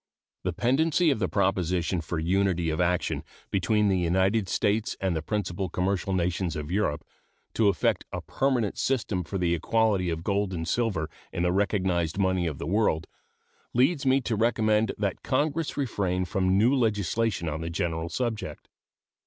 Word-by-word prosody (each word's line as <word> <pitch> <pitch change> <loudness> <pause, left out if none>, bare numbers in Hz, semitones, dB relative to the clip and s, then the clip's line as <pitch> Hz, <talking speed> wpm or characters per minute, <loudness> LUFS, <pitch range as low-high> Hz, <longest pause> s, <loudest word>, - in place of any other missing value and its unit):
The - - -1
pendency 155 +6 +2
of 135 - -1
the 95 - 0
proposition 90 -3 0
for 85 +1 -4
unity 90 0 +1
of 80 - -1
action 90 0 0 0.3
between 105 +3 +2
the 95 -2 +2
United 95 +4 +1
States 105 +4 0
and 95 -3 0
the 80 - -1
principal 95 0 -2
commercial 95 +2 -1
nations 90 -2 0
of 75 +1 -5
Europe 90 -7 0 0.5
to 110 - +3
effect 95 -6 +1
a - - -3
permanent 130 -6 0
system 110 -8 0
for 95 +4 -4
the 90 -2 +1
equality 100 +1 +1
of 80 0 -3
gold 100 0 0
and 80 -1 -4
silver 105 -10 0 0.2
in 85 - -2
the 90 - +2
recognized 95 -4 0
money 95 -3 +1
of 75 -4 -4
the - - -5
world 85 -3 +1 0.7
leads 135 +5 +3
me 135 0 +3
to 120 -2 -1
recommend 110 -1 +2
that 100 -3 -2
Congress 150 +4 -1
refrain 95 -9 -1
from 95 0 +1
new 115 +6 +4
legislation 110 - 0
on 80 +1 -3
the 80 - -3
general 85 -1 -2
subject. 120 0 -4
95 Hz, 165 wpm, -27 LUFS, 85-110 Hz, 0.7 s, new